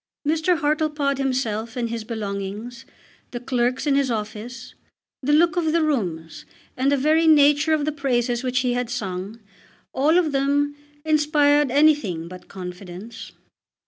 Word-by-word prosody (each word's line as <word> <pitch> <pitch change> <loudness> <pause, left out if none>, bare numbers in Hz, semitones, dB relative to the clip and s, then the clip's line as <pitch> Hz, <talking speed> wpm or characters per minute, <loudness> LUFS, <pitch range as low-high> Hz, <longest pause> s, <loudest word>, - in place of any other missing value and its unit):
Mr. 320 +3 +2
Hartlepod 300 -2 0
himself 235 -4 -2
and 235 -2 -2
his 230 -1 -4
belongings, 215 +1 -5 0.4
the 240 - -6
clerks 245 +1 -1
in 290 - +2
his 275 -1 +2
office, 225 +2 -5 0.5
the 280 +2 0
look 320 +2 +4
of 320 -2 +1
the 335 -1 +2
rooms, 175 - -2 0.3
and 265 +2 +1
the 285 - +3
very 310 +4 +3
nature 295 0 +5
of 300 -2 +1
the 305 - 0
praises 245 -4 -1
which 255 0 0
he 250 -1 0
had 245 -1 -2
sung, 200 -2 -5 0.5
all 300 +6 +3
of 335 -4 +2
them 285 +1 +1 0.3
inspired 295 -2 +3
anything 260 - +2
but 180 +1 -11
confidence. 185 +4 -9
260 Hz, 145 wpm, -23 LUFS, 225-295 Hz, 0.5 s, nature